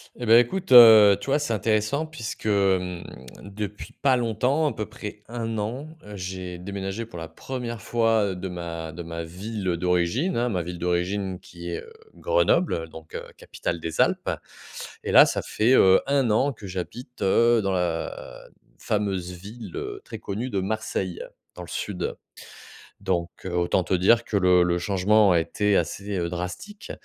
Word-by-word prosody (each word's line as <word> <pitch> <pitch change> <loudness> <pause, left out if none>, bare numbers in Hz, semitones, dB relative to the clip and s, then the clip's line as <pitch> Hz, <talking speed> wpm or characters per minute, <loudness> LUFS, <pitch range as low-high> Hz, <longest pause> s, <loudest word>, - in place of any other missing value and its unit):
Et 120 - -6
beh, 115 +1 +7
écoute, 175 +6 -1
heu, 110 -5 +10
tu - - -9
vois, 145 - +3
c'est 130 -6 -1
intéressant 110 +8 0
puisque, 130 -9 -7
mmh, 95 -3 +1 0.4
depuis 100 +1 -7
pas 135 -2 +2
longtemps, 125 +6 +1
à - - -5
peu 110 - -4
près 105 0 -8
1 115 -1 -4
an, 120 +8 -4 0.2
heu, 105 0 -9
j'ai 90 -1 -6
déménagé 95 +4 -5
pour 90 -6 -10
la 80 - -6
1re 120 -1 -6
fois, 115 -2 +2
heu, - - -5
de 90 +1 -5
ma 85 -3 -6
de 85 +2 -7
ma 85 0 -5
ville, 95 +4 -6
heu, 85 -2 +1
d'origine, 90 - 0
hein. 120 +1 +1
Ma 90 -6 -1
ville 85 +1 -7
d'origine 90 +2 -1
qui 85 0 -10
est, - - -4
heu, 455 - -15 0.2
Grenoble, 480 - +2
heu, 80 -1 -3
donc 80 0 -12
heu, - - -4
capitale 85 - -4
des 80 0 -1
Alpes. - - +1 0.7
Et - - -2
là, - - +9
ça - - -1
fait, 115 +4 +1
heu, 95 -6 +6
1 135 -3 +2
an 135 +6 +2
que 110 -4 -10
j'habite, 95 +8 -7
heu, 115 +4 +4
dans 100 -1 -1
la 90 -3 -3 0.3
fameuse 95 -4 -2
ville, 105 - -10
heu, 405 0 -5
très - - -8
connue 110 +6 -4
de 100 -5 -1
Marseille, 95 -3 -3 0.3
dans - - -8
le - - -10
sud. - - -4 0.8
Donc 85 -2 -1 0.2
heu, 90 - -4
autant 90 +1 +1
te - - -2
dire 115 +6 +4
que 105 - 0
le 90 -1 +5
le 85 0 +1
changement 100 +2 +3
a 85 - +4
été 105 +5 +1
assez, 100 +4 -2
heu, 85 -1 -1
drastique, 90 - -6
100 Hz, 185 wpm, -25 LUFS, 90-115 Hz, 0.8 s, heu